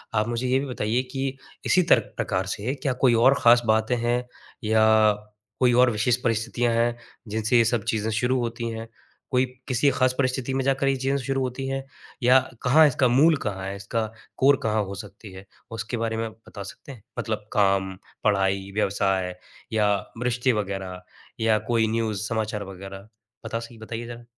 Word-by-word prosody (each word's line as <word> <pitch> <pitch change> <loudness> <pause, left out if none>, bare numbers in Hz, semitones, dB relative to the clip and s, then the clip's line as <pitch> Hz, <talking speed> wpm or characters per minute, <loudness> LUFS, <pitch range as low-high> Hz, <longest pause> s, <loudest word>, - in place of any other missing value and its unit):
आप 105 +1 +2
मुझे 120 +2 -2
ये 130 +1 +3
भी 140 - -3
बताइए 120 -1 -1
कि 135 -1 -3 0.3
इसी 180 - +4
तर 120 - +8 0.2
प्रकार 95 -1 -1
से 110 +7 -2
क्या 135 -3 0
कोई 125 - +6
और 135 - +7
ख़ास 120 +1 +6
बातें 110 +2 +2
हैं? 120 +1 0 0.4
या 110 0 +3 0.8
कोई 125 -2 +4
और 125 - +5
विशेष 115 +3 +1
परिस्थितियाँ 115 +1 0
हैं 120 +1 +1 0.3
जिनसे 110 +3 +1
ये 115 - +5
सब 115 -2 0
चीज़ें 110 0 -1
शुरू 125 +4 +1
होती 115 0 -3
हैं? 115 0 -6 0.4
कोई 130 0 +3 0.2
किसी 130 +3 +3
ख़ास 130 0 +2
परिस्थिति 130 -1 0
में 135 - 0
जाकर 135 0 +1
ये 135 - +3
चीज़ें 135 +2 0
शुरू 135 -1 0
होती 130 +1 -3
है? 135 0 -3 0.4
या 130 +2 +7 0.2
कहाँ 150 +5 +6
इसका 130 -1 +2
मूल 145 +7 +5
कहाँ 95 -2 -3
है? 100 - -4
इसका 105 +3 -2 0.3
कोर 135 +1 +5
कहाँ 110 -1 +1
हो 100 +1 -6
सकती 100 +1 -10
है? 95 +1 -11 0.3
उसके 115 +1 -4
बारे 115 0 -2
में 115 0 -2
बता 110 -2 -11
सकते 100 +7 -10
हैं? 120 -7 -13 0.2
मतलब 110 -1 -4
काम, 95 -3 +2 0.3
पढ़ाई, 100 -1 +1
व्यवसाय 95 -3 0 0.4
या 105 -2 +3 0.2
मृष्टि 125 +1 +1
वगैरह 95 -2 -6 0.4
या 110 -1 +3
कोई 115 -1 +3
न्यूज़ 110 -3 -1
समाचार 110 -2 -2
वगैरह? 95 +2 -10 0.4
बता 115 - -2
सी 115 0 -10
बताइए 115 +1 -6
ज़रा। 120 0 -9
115 Hz, 180 wpm, -25 LUFS, 105-125 Hz, 0.8 s, तर